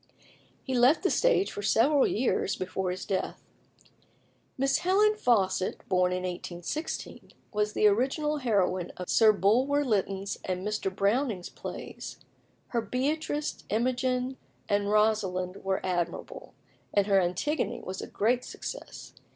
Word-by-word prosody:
He 260 - -3
left 255 +8 +4
the 380 - +2
stage - - +3
for - - -5
several 270 +7 +4
years 225 -4 0
before 185 0 -3
his 180 +1 -4
death. 190 -2 -3 1.1
Miss 275 +1 +2
Helen 400 +4 +4
Faucit, 195 - +1
born 180 -1 +3
in 180 0 -2
1816, 180 - -5 0.2
was 210 0 0
the - - +2
original 265 +8 +2
heroine 195 -8 +1
of 180 - -4
Sir 220 -1 +6
Bulwer 255 +9 +2
Lytton's 200 -3 -1
and 185 0 -3
Mr. 210 -2 -1
Browning's 200 +1 0
plays. - - -8 0.5
Her 235 - 0
Beatrice, 295 +6 -2
Imogen, 250 +3 0 0.3
and 205 -1 +1
Rosalind 200 -4 +1
were 190 0 -1
admirable, 175 -2 -3 0.4
and 200 -1 +3
her 195 -1 +4
Antigone 180 - -1
was 190 +1 -6
a - - -6
great 240 +4 +1
success. - - -8
210 Hz, 130 wpm, -28 LUFS, 190-265 Hz, 1.1 s, Sir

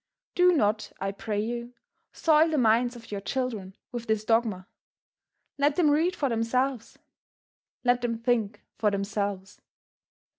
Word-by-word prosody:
Do 360 0 +5
not, 215 -8 +1
I 195 +1 -2
pray 205 +1 -3
you, 235 +3 -4 0.4
soil 315 0 +4
the 310 - 0
minds 240 0 +3
of 230 -2 -12
your 200 -1 -3
children 215 -5 -3 0.2
with 240 -2 -6
this 220 -1 0
dogma. 220 -5 +1 0.9
Let 285 +1 +3
them 310 -4 +4
read 330 +5 +2
for 285 - 0
themselves; 240 +1 -1 0.9
let 245 -1 +3
them 235 -1 -1
think 225 -3 -1 0.2
for 215 - +3
themselves. 200 -1 -3
230 Hz, 140 wpm, -27 LUFS, 210-255 Hz, 0.9 s, Do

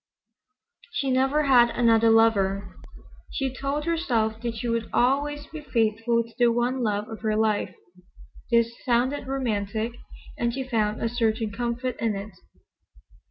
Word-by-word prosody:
She 270 -2 -1
never 270 +4 +2
had 245 -4 +5
another 230 -2 +3
lover. 200 -4 +2 0.5
She 265 -2 -2
told 275 +3 -3
herself 235 -10 0
that 235 -1 -3
she 230 +2 -4
would 230 -1 -1
always 290 +4 +1
be 310 0 -9
faithful 230 -2 +1
to 230 0 -17
the 240 - +5
one 240 +2 0
love 210 -2 -1
of 220 -1 -8
her 215 -1 0
life. 215 -3 0 0.7
This 235 -1 +3
sounded 255 +3 0
romantic, 220 -4 -2 0.5
and 235 0 +1
she 265 - -2
found 215 -4 0
a - - +2
certain 225 -2 0
comfort 240 +3 -3
in 225 -3 0
it. 200 +2 -6
235 Hz, 145 wpm, -25 LUFS, 220-260 Hz, 0.7 s, had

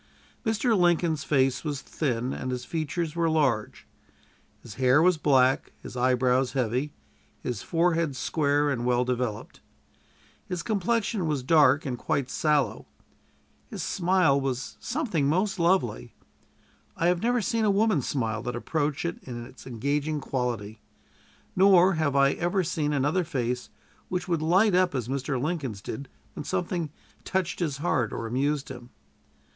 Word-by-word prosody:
Mr. 225 0 +1
Lincoln's 170 -4 +2
face 135 -4 +1
was 145 -4 -3
thin, 125 -4 -2
and 130 - -4
his 125 -1 -4
features 160 0 -3
were 170 -1 +1
large. 140 -9 0 0.8
His - - -9
hair 130 +3 +5
was 175 0 +4
black, 135 -3 +3
his - - -9
eyebrows 125 +1 +2
heavy, 130 +2 -1 0.5
his 120 -5 -3
forehead 165 -3 +1
square 145 +1 +1
and 120 -3 -2
well 125 0 +2
developed. 125 -4 -3 0.9
His 180 -2 -3
complexion 210 -2 0
was 145 -4 -1
dark 145 0 +4
and 125 -3 -3
quite 130 -2 -1
sallow. 150 -3 0 0.8
His - - -5
smile 175 -6 +2
was 135 -1 -3
something 220 - -1
most 190 +4 0
lovely. 170 - +1 0.8
I 165 - 0
have 175 0 +2
never 245 +2 +2
seen 230 0 0
a 215 - +3
woman's 200 - +2
smile 115 -5 -1
that 120 +1 -4
approached 150 +4 -2
it 170 - -3
in 120 -2 -7
its 130 - -14
engaging 145 +5 -1
quality; 120 -6 -3 0.7
nor 190 -1 +6
have 155 -4 0
I 140 0 +5
ever 175 +4 0
seen 150 -2 -1
another 145 +6 +1
face 125 -6 -3 0.4
which 180 0 -2
would 170 -3 0
light 185 +6 +3
up 180 -4 +3
as 125 -4 -2
Mr. 135 0 -2
Lincoln's 140 - -3
did 125 +6 -7 0.2
when 150 - -6
something 175 -1 -2 0.3
touched 185 -2 -2
his 155 -6 -1
heart 130 -8 0
or 115 - -4
amused 140 +5 -1
him. 125 -2 -9
145 Hz, 150 wpm, -27 LUFS, 125-175 Hz, 0.9 s, nor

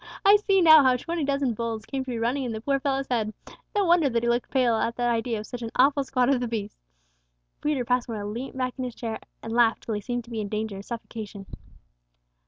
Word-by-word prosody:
I 405 +1 +8
see 395 -2 +2
now 315 -3 +9
how 260 -1 +4
twenty 335 +5 -3
dozen 275 -3 0
bulls 225 -1 -4
came 270 +1 -3
to 260 - -9
be 240 - -2
running 240 +5 0
in 240 -3 -3
the 220 - -4
poor 275 +3 +1
fellow's 270 0 -1
head; 220 -3 0 0.4
no 405 -1 +3
wonder 335 -4 +4
that 230 -1 0
he 235 - +1
looked 240 +1 0
pale 250 -3 +2
at 230 +1 -1
the 245 - -3
idea 235 -1 0
of 210 - -6
such 245 +1 -7
an 230 - -4
awful 280 +2 +4
squad 255 -2 +1
of 255 - +1
the 245 - -2
beasts!" 210 - -6 0.7
Peter 295 -5 0
Passmore 235 -4 -1
leant 240 +6 -5
back 255 -1 -1
in - - -1
his 250 -2 -5
chair, 225 -2 -4 0.2
and 225 - -5
laughed 235 -1 +3
till 225 - -3
he 210 - -2
seemed 245 +3 -3
to 235 - -15
be 225 -2 -2
in 205 - -4
danger 215 -1 -3
of 200 - -10
suffocation. 220 -4 -7
240 Hz, 245 wpm, -26 LUFS, 225-270 Hz, 0.7 s, now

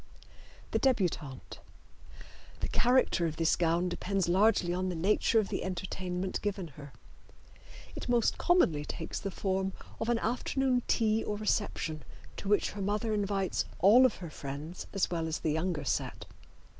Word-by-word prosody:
The - - +1
Debutante. 175 - -1 1.0
The - - -1
character 245 -8 +3
of 160 - -4
this 165 -1 +2
gown 170 +1 +1
depends 190 +1 -1
largely 185 -1 +3
on 185 +1 -1
the 180 - -3
nature 200 +6 +2
of 215 -3 +2
the - - -2
entertainment 185 0 -3
given 195 -4 -3
her. 145 0 -11 1.0
It - - -6
most 240 -2 +2
commonly 175 - +3
takes 160 +2 -5
the 200 - -3
form 190 0 -1 0.3
of 225 - -2
an 240 - +3
afternoon 250 +2 0
tea 220 -1 +2
or 210 - -3
reception 205 -7 -1 0.4
to - - -6
which 205 - +2
her 205 - -6
mother 210 +3 0
invites 200 -2 0
all 235 +8 +7
of - - -6
her 170 -4 -8
friends 145 +6 -7
as 195 -3 0
well 165 -2 -1
as 160 - -3
the 155 - 0
younger 160 -1 -1
set. - - -2
190 Hz, 155 wpm, -31 LUFS, 170-215 Hz, 1.0 s, all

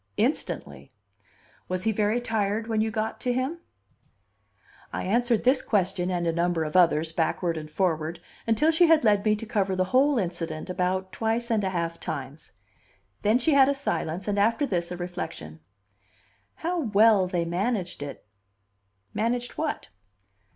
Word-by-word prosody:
"Instantly." 70 -1 -2 0.8
"Was 185 0 -2
he 225 - +2
very 215 +2 +1
tired 220 -2 -1
when 220 -1 0
you 220 - +1
got 220 0 -3
to 250 - 0
him?" 260 +7 -2 1.3
I - - -3
answered 235 +3 +1
this 260 +2 +4
question 185 -3 0
and 175 -2 -1
a 165 - +2
number 170 0 0
of 155 +1 -5
others, 165 -3 +4
backward 165 +1 0
and 155 -1 -6
forward, 165 -1 -1 0.3
until 290 +8 +3
she 335 +2 +5
had 320 -3 +5
led 205 -3 +3
me 215 -1 +3
to 215 - -7
cover 195 -3 0
the 185 - +2
whole 275 +2 +4
incident 170 -4 -3
about 185 +1 -1
twice 230 +3 -1
and 215 -2 +2
a 190 - 0
half 170 -2 -3
times. 145 - -6 0.7
Then 215 +3 +3
she 275 +5 +2
had 275 -1 +6
a 280 - +1
silence, 190 - -3
and 205 -1 0
after 230 +8 +2
this 175 -8 -2
a 180 - -4
reflection. 175 - -6 1.0
"How 345 +2 -2
well 215 - +4
they 175 -2 -1
managed 185 +1 -2
it!" 145 -6 -7 0.9
"Managed 240 +3 -1
what?" 315 -1 -3
200 Hz, 160 wpm, -26 LUFS, 175-235 Hz, 1.3 s, had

